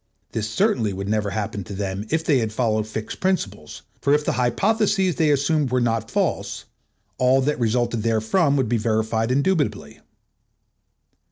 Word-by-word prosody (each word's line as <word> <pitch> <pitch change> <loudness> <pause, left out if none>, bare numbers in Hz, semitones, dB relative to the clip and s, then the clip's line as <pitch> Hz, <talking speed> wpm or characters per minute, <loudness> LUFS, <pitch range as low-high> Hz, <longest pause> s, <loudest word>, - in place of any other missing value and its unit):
This 110 -1 -3
certainly 110 -1 +1
would 100 +1 -5
never 105 -1 0
have 110 - -2
happened 100 -3 -4
to 100 - -6
them 100 +1 -4
if 160 0 0
they 140 -5 +3
had 110 -2 -1
followed 110 -2 0
fixed 110 0 -6
principles; 105 - -2 0.2
for 140 +1 +3
if 150 0 -1
the - - +1
hypotheses 190 - +1
they 155 -2 +3
assumed 145 0 +2
were 130 - +2
not 115 -2 0
false, - - -2 0.5
all 130 +1 +4
that 150 +2 0
resulted 120 0 0
therefrom 115 - +2
would 130 - +1
be 120 +1 +1
verified 110 +1 0
indubitably. 145 +4 0
120 Hz, 165 wpm, -23 LUFS, 110-145 Hz, 0.5 s, all